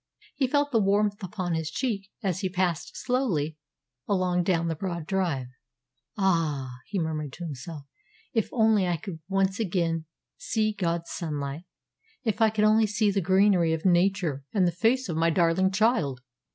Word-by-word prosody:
He 265 - +1
felt 285 +2 +1
the 230 - +3
warmth 205 +1 +2
upon 180 -2 -3
his 160 -1 -1
cheek 200 -1 -2
as 185 -2 0
he 190 - -1
passed 180 -3 -1
slowly 185 - 0 0.5
along 185 -2 +1
down 170 -2 +1
the 165 - 0
broad 170 -1 -4
drive. 170 -8 -1 0.7
"Ah," 150 -10 0
he 205 - -3
murmured 155 -4 -2
to 175 - -8
himself, 150 -1 -7 0.5
"if 225 -3 +1
only 220 -5 +3
I 175 -1 0
could 165 +1 -7
once 195 0 +1
again 170 -5 0 0.3
see 215 -1 0
God's 170 -4 -2
sunlight! 150 -1 -4 0.6
If 220 -3 -1
I 220 - +6
could 215 0 +1
only 215 +1 +5
see 210 0 +1
the 195 0 0
greenery 185 -2 +4
of 160 +2 -3
nature 175 -5 +2
and 190 -4 +3
the - - +1
face 230 +9 +1
of 165 -3 -3
my 165 +1 +3
darling 170 +2 +3
child!" 190 - +1
185 Hz, 165 wpm, -27 LUFS, 165-205 Hz, 0.7 s, I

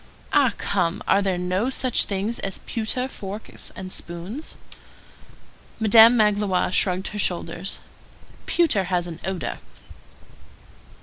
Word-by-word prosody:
"Ah, 270 -5 +4
come! 180 -3 -1
Are 200 - +4
there 190 -2 0
no 185 +7 -1
such 260 -2 +2
things 205 +4 -2
as 195 -1 -3
pewter 245 +3 -1
forks 205 -4 -8
and 185 0 -7
spoons?" 180 - -6 1.2
Madame 225 +2 +7
Magloire 205 -4 +2
shrugged 185 0 +1
her 210 - -6
shoulders. 175 0 -2 0.7
"Pewter 275 - +2
has 180 -1 0
an 170 -2 -8
odor." 175 - -4
195 Hz, 115 wpm, -23 LUFS, 180-220 Hz, 1.2 s, Madame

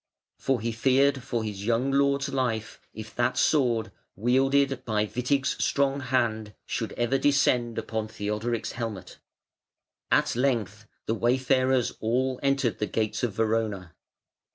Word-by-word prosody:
For 135 -4 0
he 115 +1 -1
feared 130 +4 +2
for 120 -2 -2
his 105 -2 -5
young 120 +5 +1
lord's 140 0 +2
life 115 -5 -2
if 110 0 -9
that 120 - +1
sword, 120 -7 +2 0.2
wielded 135 +4 +2
by 105 -2 0
Witig's 130 +4 -1
strong 140 0 +1
hand, 115 -5 -1
should - - -3
ever 120 +3 0
descend 125 -4 +2
upon 110 -1 -3
Theodoric's 110 +2 -3
helmet. 110 -6 -6 0.9
At - - +2
length 110 -5 -1 0.2
the 110 - 0
wayfarers 130 +1 +2
all 125 +3 0
entered 135 -4 +1
the 105 - -1
gates 110 -1 -1
of 120 -4 -1
Verona. 110 -5 -1
120 Hz, 130 wpm, -27 LUFS, 110-135 Hz, 0.9 s, feared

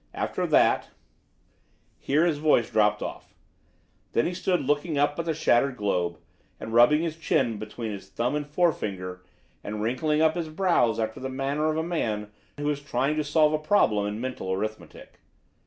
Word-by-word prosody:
After - - -2
that - - +3 0.6
" - - -40
Here 150 +5 +2
his 155 -4 0
voice 150 -7 +2
dropped 105 -1 +2
off. - - -8 0.8
Then 115 - +2
he 180 - -1
stood 180 0 0
looking 145 +2 0
up 145 +2 +1
at 170 - -2
the 165 - 0
shattered 130 -3 +2
globe, 90 -5 -1 0.4
and 110 - -7
rubbing 135 +7 +5
his 165 -2 -2
chin 120 -8 0
between 110 +1 -5
his 100 - -8
thumb 125 +3 -1
and 150 -1 -2
forefinger 100 - -1 0.4
and 105 +1 -5
wrinkling 150 +7 0
up 160 0 +4
his 170 -2 -4
brows 155 - +2
after 110 0 -2
the 130 - -4
manner 140 +3 -1
of 155 - -1
a 160 - 0
man 110 -12 -2 0.3
who 145 0 -3
is 145 - -3
trying 145 0 -1
to 155 - +1
solve 150 +1 +3
a 155 - +1
problem 110 - +2
in 105 +1 -4
mental 125 -6 -4
arithmetic. 100 -3 -6
140 Hz, 180 wpm, -26 LUFS, 110-155 Hz, 0.8 s, rubbing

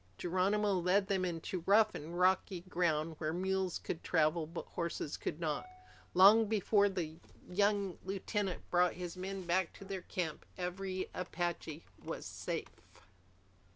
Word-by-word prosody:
Geronimo 195 +4 +1
led 185 +2 +3
them 195 -1 0
into 175 0 -3
rough 215 +2 +6
and 165 +4 -6
rocky 185 0 +2
ground 165 -3 0
where 155 0 -1
mules 190 +1 0
could 165 - -5
travel 160 -1 +2
but 170 +2 -6
horses 170 -3 -3
could 150 - -4
not. 160 - -2 0.5
Long 210 +4 +8
before 205 -1 +3
the 165 -5 -4 0.3
young 200 -1 +1
lieutenant 195 0 -2
brought 180 0 +4
his 180 -1 -6
men 190 0 -5
back 175 0 +1
to 195 - -11
their 190 -1 -4
camp, 170 -3 -3
every 185 +1 -3
Apache 175 -3 -3 0.2
was - - -5
safe. - - -5
180 Hz, 140 wpm, -35 LUFS, 170-195 Hz, 0.5 s, Long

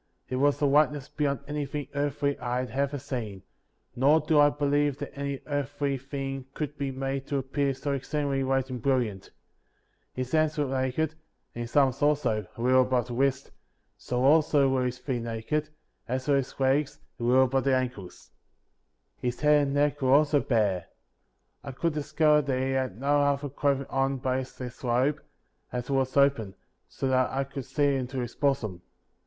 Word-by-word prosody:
It 130 - -2
was 145 +1 +2
a - - +5
whiteness 145 -1 +2
beyond 140 -4 -1
anything 145 -1 -3
earthly 140 0 0
I 120 0 -2
had 130 - -6
ever 140 +1 -1
seen; 120 -8 -5 0.5
nor 140 +5 +4
do 155 -1 +2
I 145 0 +7
believe 145 -1 +1
that - - -7
any 140 -1 -4
earthly 145 -1 -2
thing 135 0 -5
could 150 -1 -4
be 140 -2 -3
made 135 +1 -3
to 140 - -1
appear 135 +1 -1
so 140 +2 -3
exceed 145 +2 -2
ingly 135 -1 0
white 135 0 0
and 125 -2 -5
brilliant. 120 -7 0 0.9
His 130 0 -4
hands 155 -1 +2
were 145 - +1
naked, 135 +4 -1 0.4
and 120 - -5
his 120 0 -7
arms 135 -3 +3
also, 145 -9 +1
a - - -6
little 130 +1 +5
above 125 -1 0
the - - -4
wrist; 135 +2 0 0.4
so, 125 0 -2
also, 145 -1 +4
were 130 -1 +1
his 125 0 -2
feet 125 -1 -3
naked, 115 +7 -2 0.4
as 130 +2 -3
were 140 -1 +4
his 135 0 -4
legs, 135 +2 +1 0.2
a - - -5
little 125 +2 +5
above 130 +1 0
the 135 -1 +4
ankles. 125 -8 -5 0.9
His 125 -1 -3
head 150 -1 +4
and 140 - -2
neck 145 0 +1
were 130 0 +3
also 145 0 +4
bare. 105 -9 0 0.8
I 140 - -7
could 165 +5 -1
discover 150 0 +3
that 135 -3 -1
he 130 +1 0
had 130 -6 -2
no 145 +2 +2
other 145 0 +1
clothing 140 0 0
on 135 0 +1
but 130 0 -1
this 125 0 -8
robe, 125 +4 +1 0.5
as 125 +2 -4
it - - +1
was 135 0 0
open, 135 -8 +3 0.3
so 135 - -3
that 130 -1 +2
I 135 +1 -1
could 135 -1 -7
see 145 -2 +1
into 130 0 -3
his 120 -1 -5
bosom. 130 -11 -1
135 Hz, 185 wpm, -27 LUFS, 130-145 Hz, 0.9 s, I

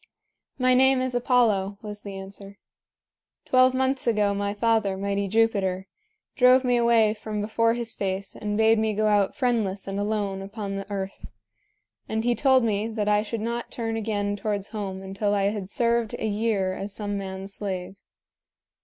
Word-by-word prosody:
"My 255 -1 +3
name 265 +1 +5
is 255 -1 -1
Apollo," 230 -6 +2
was 210 -1 -7
the 200 -1 -7
answer. 195 +1 -10 0.9
"Twelve 255 0 +4
months 265 0 0
ago 210 -3 +2
my 200 0 -1
father, 215 -3 +1
mighty 200 0 -1
Jupiter, 195 -3 +1 0.5
drove 255 +1 +5
me 250 -1 +2
away 235 -2 +4
from 215 -1 -5
before 230 +2 +1
his 235 -1 -3
face 195 0 -3
and 210 -1 -3
bade 220 0 +4
me 220 -1 0
go 215 +1 +1
out 205 -2 +2
friendless 220 -7 0
and 195 0 -3
alone 205 -2 -1
upon 200 0 -5
the 195 +1 -6
earth; 195 -1 -5 0.8
and 220 0 -1
he 240 +1 +2
told 260 0 +4
me 215 -1 0
that 220 -2 -3
I 210 0 +3
should 220 +1 -4
not 235 +1 -3
turn 225 -1 -3
again 205 -2 -1
towards 205 -1 -3
home 195 -3 -5
until 195 +2 -1
I 200 0 +2
had 200 -3 -5
served 235 0 +1
a - - -3
year 205 -3 0
as 195 +2 -5
some 205 -1 -3
man's 195 0 -5
slave. 190 -2 -5
210 Hz, 170 wpm, -25 LUFS, 200-230 Hz, 0.9 s, name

